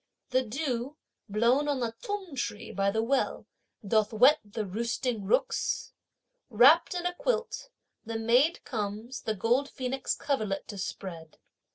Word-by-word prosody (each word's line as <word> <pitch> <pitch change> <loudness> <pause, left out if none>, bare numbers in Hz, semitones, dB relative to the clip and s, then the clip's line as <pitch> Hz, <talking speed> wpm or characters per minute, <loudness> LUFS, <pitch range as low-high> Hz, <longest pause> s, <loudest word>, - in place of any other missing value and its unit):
The 255 +1 +4
dew, 260 +2 -3 0.3
blown 235 +8 +3
on 285 -2 0
the 235 -2 -2
t'ung 405 -6 -4
tree 230 -3 -4
by 195 +1 +1
the 220 +2 0
well, 265 +3 0 0.4
doth 215 0 +2
wet 250 +7 +6
the 210 +1 -4
roosting 230 +2 -2
rooks. 200 - 0 0.6
Wrapped 275 +11 +6
in 355 0 -3
a 355 - 0
quilt, - - -2 0.3
the 225 0 -4
maid 245 +9 +3
comes 220 +2 -4
the 220 - -2
gold 245 +8 +1
phoenix 265 +1 -2
coverlet 215 -9 -2
to 205 -3 -6
spread. 170 -4 -6
235 Hz, 145 wpm, -29 LUFS, 215-275 Hz, 0.6 s, wet